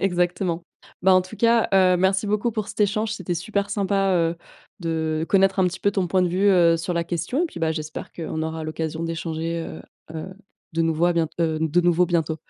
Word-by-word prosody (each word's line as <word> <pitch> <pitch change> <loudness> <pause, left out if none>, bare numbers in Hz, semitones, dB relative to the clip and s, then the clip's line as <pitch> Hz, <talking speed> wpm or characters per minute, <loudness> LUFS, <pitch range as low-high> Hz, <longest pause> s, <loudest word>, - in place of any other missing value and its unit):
Exactement. 175 -2 0 0.4
Bah, 190 0 +6
en 185 - +5
tout 185 +4 -11
cas, 230 0 +3
heu, 185 -1 +5
merci 190 +3 +1
beaucoup 210 +3 0
pour 215 -2 -3
cet - - -7
échange, 215 +1 +1
c'était 180 -4 -3
super 200 +3 -2
sympa, 195 -1 +1
heu, 165 -1 +1 0.4
de 160 -1 -1
connaître 195 0 +3
un 185 - +4
petit 175 -1 -4
peu 200 - +2
ton 195 -2 0
point 185 +1 +2
de 180 - +2
vue, 190 +4 +2
heu, 170 -3 +5
sur 165 +2 -3
la 170 0 0
question 175 - -2
et - - 0
puis, - - -10
bah, 160 -1 +1
j'espère 155 -1 -6
qu'on 160 -1 -4
aura 160 0 -4
l'occasion 160 +1 -4
d'échanger, 165 0 -3
heu - - -9 0.3
heu, 170 +4 -6 0.4
de 165 - +1
nouveau 165 +1 +2
à 175 - +3
bient 165 -2 +1
heu, 160 -2 +1
de 160 +2 +2
nouveau 175 0 +3
bientôt. 160 -2 0
175 Hz, 220 wpm, -23 LUFS, 165-195 Hz, 0.4 s, Bah